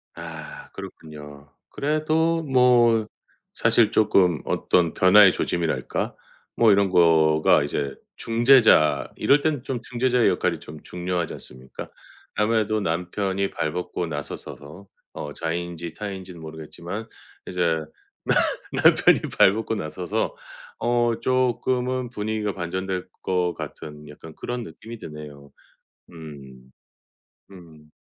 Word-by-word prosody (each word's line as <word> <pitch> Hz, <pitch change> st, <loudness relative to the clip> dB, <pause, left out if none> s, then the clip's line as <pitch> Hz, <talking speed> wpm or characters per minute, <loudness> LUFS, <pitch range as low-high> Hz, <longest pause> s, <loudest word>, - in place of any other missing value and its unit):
아 -, -, -9 dB
그렇군요. 75 Hz, -2 st, -11 dB, 0.2 s
그래도 155 Hz, +3 st, 0 dB
뭐 120 Hz, -5 st, +4 dB, 0.5 s
사실 110 Hz, -3 st, +3 dB
쪼끔 95 Hz, -6 st, +3 dB
어떤 85 Hz, -2 st, +1 dB
변화의 95 Hz, +1 st, +7 dB
조짐이랄까 85 Hz, -3 st, -2 dB, 0.4 s
뭐 115 Hz, -2 st, +5 dB
이런 100 Hz, -1 st, +3 dB
거가 80 Hz, -4 st, +4 dB
이제 70 Hz, -1 st, -3 dB, 0.2 s
중재자 115 Hz, -, +4 dB
이럴 145 Hz, +1 st, +3 dB
땐 150 Hz, -5 st, -1 dB
좀 130 Hz, -4 st, -4 dB
중재자의 125 Hz, 0 st, +1 dB
역할이 -, -, 0 dB
좀 75 Hz, 0 st, -11 dB
중요하지 90 Hz, -1 st, -3 dB
않습니까? 65 Hz, +1 st, -9 dB, 0.5 s
아무래도 110 Hz, 0 st, +1 dB
남편이 95 Hz, +3 st, -2 dB
발 80 Hz, -, -2 dB
벗고 90 Hz, 0 st, -4 dB
나셔서서 75 Hz, +3 st, -7 dB, 0.3 s
어 75 Hz, -1 st, -6 dB
자의인지 85 Hz, 0 st, -4 dB
타의인지는 95 Hz, -3 st, -7 dB
모르겠지만 80 Hz, +7 st, -7 dB, 0.4 s
이제 85 Hz, -3 st, 0 dB, 0.5 s
나 -, -, +2 dB, 0.5 s
남편이 -, -, +6 dB, 0.2 s
발 95 Hz, -, +6 dB
벗고 110 Hz, +1 st, -2 dB
나서서 90 Hz, -2 st, -3 dB, 0.4 s
어 120 Hz, -1 st, +1 dB
쪼끔은 130 Hz, 0 st, 0 dB
분위기가 105 Hz, -2 st, -3 dB
반전될 95 Hz, +1 st, -4 dB
것 90 Hz, -2 st, 0 dB
같은 75 Hz, 0 st, -9 dB
약간 80 Hz, +2 st, -12 dB
그런 120 Hz, -1 st, -4 dB
느낌이 110 Hz, +7 st, -10 dB
드네요. 75 Hz, -5 st, -10 dB, 0.6 s
음. 70 Hz, -6 st, -12 dB, 0.8 s
음. 80 Hz, -5 st, -15 dB
90 Hz, 255 characters per minute, -24 LUFS, 80-115 Hz, 0.8 s, 변화의